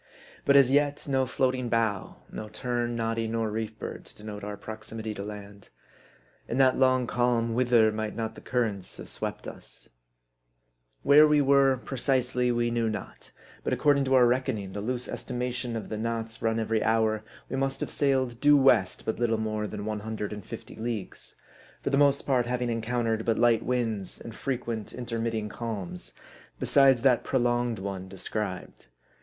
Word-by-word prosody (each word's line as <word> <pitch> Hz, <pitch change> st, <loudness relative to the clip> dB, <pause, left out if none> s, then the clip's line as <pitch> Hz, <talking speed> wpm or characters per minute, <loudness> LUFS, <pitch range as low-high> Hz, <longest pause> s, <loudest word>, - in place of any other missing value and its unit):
But 140 Hz, -, +5 dB
as 135 Hz, -2 st, +7 dB
yet, 145 Hz, +1 st, +2 dB
no 135 Hz, -2 st, +1 dB
floating 125 Hz, -1 st, 0 dB
bough, 110 Hz, -4 st, -1 dB
no 110 Hz, -, -6 dB
tern, 120 Hz, +2 st, -2 dB
noddy, 115 Hz, 0 st, -1 dB
nor 110 Hz, -1 st, -1 dB
reef 110 Hz, 0 st, -4 dB
bird, -, -, -6 dB
to -, -, -12 dB
denote 105 Hz, -1 st, -8 dB
our 105 Hz, 0 st, -5 dB
proximity 110 Hz, 0 st, -6 dB
to 100 Hz, -, -6 dB
land. 100 Hz, -1 st, -9 dB, 0.8 s
In -, -, -2 dB
that 130 Hz, -1 st, +5 dB
long 130 Hz, -1 st, +4 dB
calm, 120 Hz, -1 st, +1 dB
whither 120 Hz, -2 st, +4 dB
might 110 Hz, 0 st, -3 dB
not 110 Hz, -1 st, -3 dB
the -, -, -12 dB
cur 125 Hz, -1 st, +1 dB
rents 100 Hz, -5 st, -5 dB
have -, -, -9 dB
swept -, -, -4 dB
us? -, -, -11 dB, 1.1 s
Where 150 Hz, +2 st, +8 dB
we 150 Hz, 0 st, +4 dB
were 135 Hz, -1 st, +4 dB
precisely, 125 Hz, -1 st, 0 dB
we 120 Hz, 0 st, +1 dB
knew 115 Hz, -1 st, +1 dB
not; 110 Hz, -, -7 dB, 0.3 s
but -, -, 0 dB
according 145 Hz, -2 st, +3 dB
to 135 Hz, 0 st, +3 dB
our 125 Hz, -1 st, +7 dB
reckoning, 120 Hz, -6 st, 0 dB
the 100 Hz, -, -4 dB
loose 125 Hz, +3 st, -2 dB
estimation 125 Hz, -1 st, -3 dB
of 110 Hz, -, -5 dB
the 110 Hz, -, -4 dB
knots 115 Hz, 0 st, -3 dB
run 115 Hz, 0 st, +1 dB
every 110 Hz, 0 st, 0 dB
hour, 110 Hz, -1 st, +2 dB, 0.2 s
we -, -, -4 dB
must 135 Hz, 0 st, -1 dB
have -, -, -3 dB
sailed 130 Hz, -4 st, +1 dB
due 145 Hz, 0 st, +7 dB
west 120 Hz, -9 st, +3 dB
but 110 Hz, -, -2 dB
little 115 Hz, -2 st, +2 dB
more 110 Hz, -1 st, -2 dB
than 105 Hz, 0 st, -6 dB
one 105 Hz, -1 st, -2 dB
hundred 105 Hz, -1 st, -4 dB
and 105 Hz, -1 st, -7 dB
fifty -, -, -9 dB
leagues; 110 Hz, -3 st, -4 dB, 0.5 s
for -, -, -1 dB
the -, -, +3 dB
most 140 Hz, 0 st, +3 dB
part 125 Hz, -3 st, +2 dB
having 125 Hz, -1 st, -1 dB
encountered 115 Hz, -1 st, -1 dB
but 115 Hz, -1 st, +1 dB
light 120 Hz, -1 st, +4 dB
winds, 115 Hz, -6 st, -2 dB
and 115 Hz, -, -8 dB
frequent 120 Hz, -4 st, -4 dB
intermitting 115 Hz, -3 st, -2 dB
calms, 105 Hz, -5 st, -5 dB, 0.5 s
besides 135 Hz, -3 st, +4 dB
that 130 Hz, -3 st, +4 dB
prolonged 120 Hz, -2 st, +1 dB
one 95 Hz, -1 st, -5 dB
described. 95 Hz, -, -5 dB
115 Hz, 175 wpm, -28 LUFS, 110-125 Hz, 1.1 s, Where